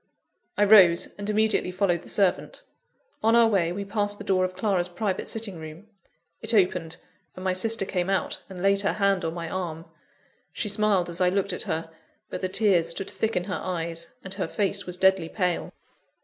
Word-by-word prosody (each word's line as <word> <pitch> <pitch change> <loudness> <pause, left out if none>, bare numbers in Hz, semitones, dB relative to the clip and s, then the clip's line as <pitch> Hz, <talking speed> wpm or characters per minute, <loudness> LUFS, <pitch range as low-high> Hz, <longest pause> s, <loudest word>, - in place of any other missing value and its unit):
I 205 - +4
rose, 190 -5 +6
and 205 +1 -4
immediately 215 -3 +2
followed 180 -2 0
the - - -9
servant. 200 - 0 0.6
On 225 +1 +3
our 235 0 +6
way, 185 -6 +1
we 200 +3 -4
passed 205 0 -1
the 205 - -8
door 190 -2 +1
of 185 0 -6
Clara's 185 -4 0
private 190 +2 -3
sitting 215 -6 -3
room 160 +6 -10 0.5
it 225 +1 +1
opened, 180 -4 +1 0.4
and 185 - -9
my 185 -1 +1
sister 220 +2 +1
came 180 -1 -2
out 195 - -1
and 185 -1 -8
laid 195 0 +3
her 200 - 0
hand 195 -3 +1
on 165 0 -3
my 170 -1 -5
arm. 165 -2 -5 0.7
She 210 - -3
smiled 205 -4 +1
as 170 +1 -2
I 180 - +4
looked 195 0 -1
at - - -3
her; 160 0 -3 0.4
but - - -5
the 185 - -1
tears 185 -4 +2
stood 185 +3 -2
thick 220 0 -2
in 180 - 0
her 180 -4 -4
eyes, 170 -2 -3 0.2
and 190 - -6
her 195 -4 -3
face 195 +1 0
was 180 0 -2
deadly 190 -3 +3
pale. 180 -4 -1
190 Hz, 200 wpm, -25 LUFS, 175-205 Hz, 0.7 s, rose